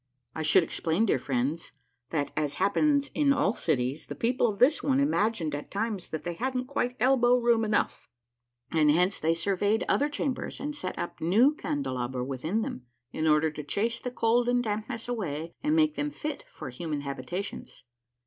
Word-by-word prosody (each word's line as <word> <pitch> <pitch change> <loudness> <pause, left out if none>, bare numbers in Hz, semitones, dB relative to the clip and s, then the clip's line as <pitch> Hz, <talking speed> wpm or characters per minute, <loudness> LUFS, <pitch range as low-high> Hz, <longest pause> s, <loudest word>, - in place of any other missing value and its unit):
I 160 - -4
should 155 +4 +5
explain, 165 +5 0
dear 195 - +2
friends, 135 +5 -2 0.4
that, 145 -3 -1
as 150 -2 -1
happens 280 +8 +2
in 290 -2 +3
all 275 -7 +2
cities, 135 - -1
the - - -6
people 245 +1 +1
of 205 - -4
this 265 +7 +4
one 270 -1 +2
imagined 220 - +1
at 145 0 -5
times 205 -2 -3
that 160 - -4
they 175 - -3
hadn't 255 +6 -2
quite 250 -2 -1
elbow 250 -1 +4
room 235 -2 +3
enough, 215 -1 -1 0.6
and 155 -2 +4
hence 180 +6 +3
they 165 +1 +2
surveyed 200 +5 +1
other 290 +2 +2
chambers, 280 -2 -3
and 295 +2 -4
set 185 -11 -5
up - - -5
new 220 - +4
candelabra 130 - -3
within 155 - -2
them, 125 - -6 0.2
in 155 - -1
order 155 0 +4
to 150 0 -7
chase 225 +10 -1
the 250 - -4
cold 240 0 +2
and 245 0 +2
dampness 220 +2 -3
away, 170 -9 -3
and 300 +2 +1
make 310 -1 +4
them 295 0 -2
fit 295 0 -5
for 135 -5 -8
human 150 +2 -4
habitations. 140 +8 -6
205 Hz, 180 wpm, -28 LUFS, 155-250 Hz, 0.6 s, should